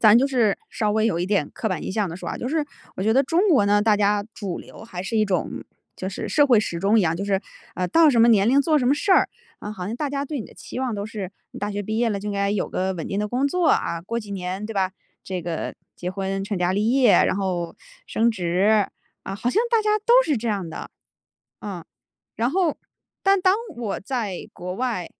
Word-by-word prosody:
咱 215 -1 +7
就 260 +3 +4
是 240 -6 +2
稍 210 -2 0
微 215 +1 +2
有 195 -7 0
一 175 - -1
点 190 -7 +1
刻 220 - -2
板 185 - -2
印 - - -3
象 205 -1 0
地 165 - -6
说 - - -6
啊， - - -3
就 245 - -3
是 305 +1 0 0.3
我 - - -3
觉 220 +3 +3
得 260 - +5
中 345 +9 +2
国 255 -11 +4
呢， 205 0 +4
大 215 -1 +4
家 205 0 +2
主 195 -6 -5
流 - - -12
还 185 -6 -6
是 225 +4 -2
一 215 - +4
种 190 -4 -1 0.5
就 185 - -4
是 195 - -5
社 290 -1 +4
会 240 -6 +5
时 170 -5 -3
钟 200 +5 +3
一 - - +4
样， 165 -1 +1
就 195 - -3
是 195 -1 +1 0.3
呃 180 0 -1
到 325 - +6
什 245 -5 +4
么 235 - +6
年 210 -2 +5
龄 275 +3 +5
做 310 0 +3
什 250 - 0
么 270 - +4
事 300 - -2
儿， - - +5 0.3
嗯 210 - -6
好 180 -3 -5
像 220 +3 -4
大 295 +3 -2
家 280 0 -2
对 290 0 -4
你 - - -7
的 - - -17
期 - - -8
望 255 -3 -1
都 200 -1 -3
是， 205 -3 -6 0.2
你 - - -9
大 205 - -2
学 205 +1 -3
毕 220 +2 -2
业 235 0 +2
了 200 -3 -2
就 210 - -5
应 - - -2
该 200 0 0
有 205 - -1
个 190 +1 -1
稳 165 - -5
定 195 - -2
的 210 - 0
工 250 +6 0
作 355 +3 +1
啊， 170 - +1
过 230 +6 -3
几 210 -2 -11
年 190 +1 -4
对 225 - -5
吧？ 190 -2 0 0.3
这 185 -2 -4
个 165 -1 -4 0.2
结 180 - -4
婚 195 0 -3
成 200 +1 -3
家 180 0 +1
立 210 +4 +1
业， 255 -3 +5
然 - - +4
后 180 -4 -2 0.3
升 230 +1 +2
职， 195 +2 +2 0.3
啊， - - -5
好 220 +5 -1
像 425 - +2
大 460 -2 +3
家 425 0 +2
都 450 +3 +3
是 300 - +1
这 230 +1 -3
样 200 -5 -2
的， - - -7 0.7
嗯。 185 -5 -6 0.5
然 235 +3 +1
后 345 -2 +1 0.4
但 390 0 +4
当 370 +1 +4 0.2
我 225 -5 -3
在 215 -5 -4
国 180 +1 -5
外， 235 -8 -2
210 Hz, 280 characters per minute, -23 LUFS, 190-245 Hz, 0.7 s, 咱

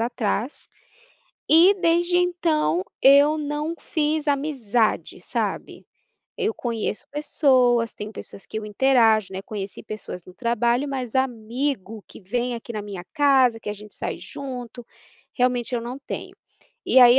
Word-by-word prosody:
atrás 235 +1 -1 0.8
e, 345 +6 +7
desde 345 -1 +2
então, 330 - +1 0.2
eu 285 +3 +7
não 300 +2 -3
fiz 310 0 -1
amizade, 265 -7 0
sabe. - - -4 0.5
Eu 435 +2 +1
conheço 230 - -3
pessoas, 255 -6 +2
tenho 210 +1 -7
pessoas 195 - -4
que - - -5
eu 220 - -6
interajo, 220 -3 +3
né, 190 - -4
conheci 200 -2 -6
pessoas 215 -4 -6
no 180 - -13
trabalho, 235 +3 +1
mas 255 -4 -4
amigo 240 -3 -2
que - - -13
vem 240 +5 -2
aqui 235 0 -7
na 210 - -3
minha 200 -3 -7
casa, 270 -6 +4
que 210 - -5
a - - -2
gente 210 0 -11
sai - - -4
junto, 245 -3 -7 0.5
realmente 250 -1 0
eu 235 - 0
não 245 +3 -6
tenho. 275 - -7 0.5
E 260 - +5
aí 245 +1 +8
245 Hz, 145 wpm, -23 LUFS, 220-285 Hz, 0.8 s, aí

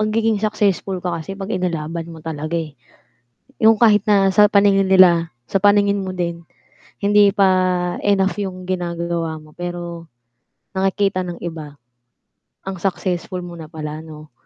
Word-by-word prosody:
magiging 215 0 +1
successful 205 -3 0
ka 170 -2 -2
kasi 195 +5 -7
'pag 195 +1 -5
inilaban 170 -2 -3
mo 165 -1 -10
talaga, 155 +1 -4
eh. 160 -3 -4 0.9
Yung 220 0 +5
kahit 210 -3 +5
na 200 -3 +4
sa 205 +2 +5
paningin 200 -1 +4
nila, 175 -3 +5 0.2
sa - - -1
paningin 200 0 +3
mo 185 - -4
din, 170 -2 -4 0.6
hindi 205 -1 +4
pa 195 -2 +3 0.6
enough 195 -3 +2
yung 185 -2 -5
ginagawa 170 -3 -3
mo, 155 0 -18
pero 175 -1 -6 0.7
nakikita 195 0 0
ng 175 -1 -6
iba, 155 -4 -7 0.8
ang 195 -1 -6
successful 180 -1 -3
mo 175 -1 -9
na 160 - -8
pala 155 -1 -7
'no. 155 -2 -12
185 Hz, 145 wpm, -20 LUFS, 170-200 Hz, 0.9 s, Yung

